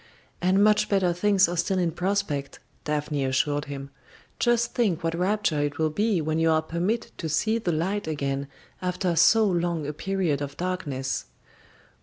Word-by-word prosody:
"And 190 +3 +3
much 210 0 +3
better 190 -3 +2
things 195 +1 +3
are 175 - -3
still 185 +3 0
in 175 -2 +1
prospect," 175 -7 -2 0.3
Daphne 150 -1 -1
assured 145 +2 0
him. 140 -1 -7 0.5
"Just 240 -1 +2
think 200 -10 0
what 165 0 0
rapture 180 -3 0
it 145 0 -2
will 155 -1 +1
be 205 +2 +1
when 155 +1 -1
you 165 0 +3
are 160 0 +3
permitted 180 +9 -2
to 160 - -3
see 220 +9 +1
the 180 -6 -1
light 185 +6 -1
again 140 -2 -2 0.3
after 180 -1 -1
so 220 +6 +5
long 170 -4 0
a 150 - -3
period 175 -3 -1
of 140 0 -5
darkness!" 150 - -3
170 Hz, 170 wpm, -26 LUFS, 150-195 Hz, 0.5 s, so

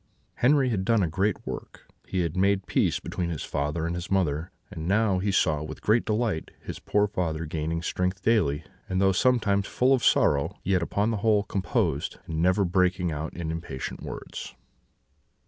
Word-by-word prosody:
"Henri 135 +1 +4
had 100 -5 0
done 110 0 +3
a - - +1
great 95 +6 -1
work; - - -7 0.2
he 95 - -1
had 85 -1 -2
made 95 0 +2
peace - - +1
between 85 -1 -3
his 80 -4 -4
father 75 +3 -2
and 85 - -1
his 90 +1 -5
mother; 85 -4 0 0.2
and 80 +1 -5
now 100 -1 +2
he 100 +2 0
saw, 80 -6 +2
with 75 - -7
great 110 +3 +3
delight, 110 -6 -1
his - - -7
poor 105 0 +2
father 80 -5 -2
gaining 80 +2 -3
strength 90 +3 -1
daily; 85 -10 +2 0.3
and 95 0 0
though 95 0 +4
sometimes 100 -2 +2
full 130 +2 +3
of 130 - +1
sorrow, 70 -1 +3
yet 95 -1 +2
upon 100 +6 0
the 110 - -1
whole 105 -1 +3
composed, 95 -2 -1
and 80 0 -2
never 95 +3 +3
breaking 90 -1 +1
out 75 +1 -4
in 85 -2 -3
impatient 80 -5 -5
words. - - -7
95 Hz, 180 wpm, -27 LUFS, 80-105 Hz, 0.3 s, Henri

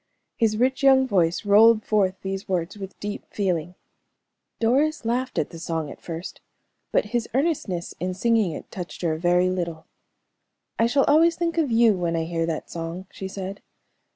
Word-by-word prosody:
His 220 -2 +1
rich 260 +3 +1
young 265 -1 +6
voice 180 -4 +1
rolled 215 +2 +6
forth 195 -3 +2
these 195 +1 -4
words 180 0 -1
with 195 -1 -9
deep 205 0 -5
feeling. 180 -4 -2 0.8
Doris 270 +5 +1
laughed 250 +3 -1
at - - 0
the 165 - -9
song 160 -3 -3
at - - -12
first, 165 +1 -7 0.5
but - - +2
his 240 -2 0
earnestness 265 - -1
in 180 0 -2
singing 225 -2 +2
it - - -9
touched 180 -1 -7
her 165 -2 +1
a 155 - -4
very 180 +1 +3
little. 170 -3 -4 0.9
"I 230 - +4
shall 275 +3 +3
always 325 +3 +4
think 335 -1 -1
of 305 -4 +1
you 230 -1 +5
when 170 -2 -1
I 165 - 0
hear 165 0 -2
that 160 -2 -3
song," 170 +2 -5
she 190 - -6
said. 195 0 -6
195 Hz, 180 wpm, -24 LUFS, 175-235 Hz, 0.9 s, young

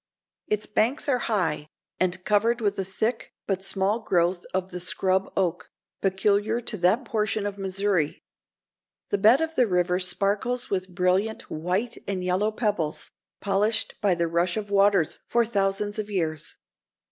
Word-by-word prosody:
Its 210 0 0
banks 230 +9 0
are 255 -3 +2
high, 165 -8 0 0.3
and 185 0 0
covered 225 +3 +2
with 205 -3 0
a - - +1
thick 220 +5 -2
but 190 -1 -2
small 195 +3 +1
growth 175 -4 0
of 185 0 -2
the 180 - -5
"scrub" 190 +1 +1
oak, 175 -3 -1 0.3
peculiar 205 +3 +1
to 240 -2 -5
that 200 +7 +2
portion 215 -2 -1
of 200 0 -4
Missouri. 190 -4 0 0.9
The 205 - +1
bed 225 +8 +6
of 320 0 -1
the 250 -6 +3
river 180 -1 +1
sparkles 205 +7 +1
with 190 -1 -1
brilliant 185 +5 0
white 185 +9 -2
and 190 -2 -2
yellow 185 +4 +1
pebbles, 205 -9 -2 0.3
polished 205 +2 +1
by 200 -4 +3
the 170 0 0
rush 170 +2 0
of 205 -1 -5
waters 195 -5 +3
for 235 0 +2
thousands 205 -1 0
of 210 0 -4
years. 160 -6 -2
195 Hz, 155 wpm, -25 LUFS, 180-215 Hz, 0.9 s, bed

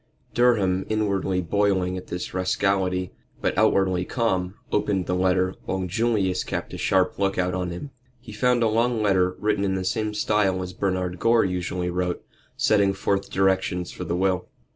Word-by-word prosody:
Durham, 100 -7 +3
inwardly 100 -3 0
boiling 95 0 +1
at 90 - -7
this 90 0 -5
rascality, 95 -1 0 0.3
but - - -1
outwardly 95 -2 +2
calm, 95 -5 -1 0.2
opened 95 -3 0
the 90 - -1
letter, 95 0 +2
while 95 -1 -2
Julius 95 -2 0
kept - - -4
a - - -5
sharp 95 0 +1
look 100 -1 0
out 90 -1 0
on 90 -1 -2
him. 90 +12 -7 0.3
He 120 -2 -12
found 125 +2 +2
a - - +4
long 115 +1 +1
letter, 95 -3 +2
written 105 -1 0
in 95 -1 0
the 95 -1 -3
same 110 +1 -1
style 105 -3 +1
as 90 0 -7
Bernard 90 -2 -2
Gore 115 -1 +4
usually 90 -1 -2
wrote, 90 0 -2 0.3
setting 100 -2 +3
forth 100 0 -1
directions 95 -2 0
for - - -7
the 85 - -2
will. 95 -1 0
95 Hz, 170 wpm, -24 LUFS, 90-105 Hz, 0.3 s, a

